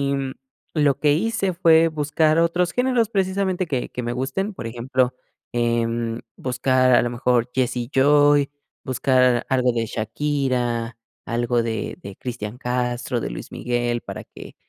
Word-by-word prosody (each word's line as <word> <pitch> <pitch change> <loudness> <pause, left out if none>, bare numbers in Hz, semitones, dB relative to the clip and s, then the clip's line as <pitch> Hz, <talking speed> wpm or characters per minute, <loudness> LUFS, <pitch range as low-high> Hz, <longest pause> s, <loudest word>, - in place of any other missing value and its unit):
mm, 135 -1 -3 0.4
lo 145 -4 +2
que 150 -1 +4
hice 195 +2 0
fue 165 -1 +5
buscar 155 +1 +1
otros 170 +1 +2
géneros, 250 -3 +1
precisamente 190 -2 0
que 130 -5 -2
que 125 - -5
me 120 0 -3
gusten, 140 - -2
por - - -7
ejemplo, 125 +2 0 0.4
em, 115 -1 0 0.2
buscar 130 0 +2
a - - +6
lo 120 - -1
mejor 120 0 +1
Jesse 130 -1 0
y 120 -1 -3
Joy, 145 +1 +5 0.3
buscar 125 -1 +2
algo 125 -2 +3
de 115 -1 0
Shakira, 120 -1 -1 0.3
algo 120 0 0
de 110 -1 -3
de 100 -1 -9
Cristian 120 -1 -6
Castro, 125 0 -1
de - - -4
Luis - - -8
Miguel, 120 -1 -1
para - - -7
que, - - -12
130 Hz, 150 wpm, -22 LUFS, 120-150 Hz, 0.4 s, a